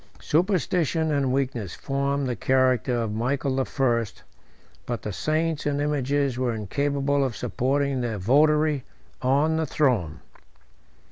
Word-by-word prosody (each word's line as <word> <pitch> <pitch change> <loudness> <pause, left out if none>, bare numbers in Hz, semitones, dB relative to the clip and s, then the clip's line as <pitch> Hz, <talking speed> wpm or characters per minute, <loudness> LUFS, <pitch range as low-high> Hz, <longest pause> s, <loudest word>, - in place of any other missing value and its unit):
Superstition 165 -2 +1
and 140 -3 +1
weakness 125 -8 -2
formed 140 0 -1
the 125 -2 -2
character 130 -2 +2
of 105 -2 -3
Michael 130 +4 -1
the 135 - +1
First, 120 -6 -1 0.6
but 120 -1 -3
the 105 - -4
saints 155 - -1
and 145 -1 0
images 140 -2 0
were 125 -3 0
incapable 140 +6 0
of 130 -5 -2
supporting 135 +1 0
their 115 -3 -2
votary 150 +6 +3 0.4
on 145 +5 +2
the 160 -1 -1
throne. 100 - 0
135 Hz, 130 wpm, -25 LUFS, 125-145 Hz, 0.6 s, votary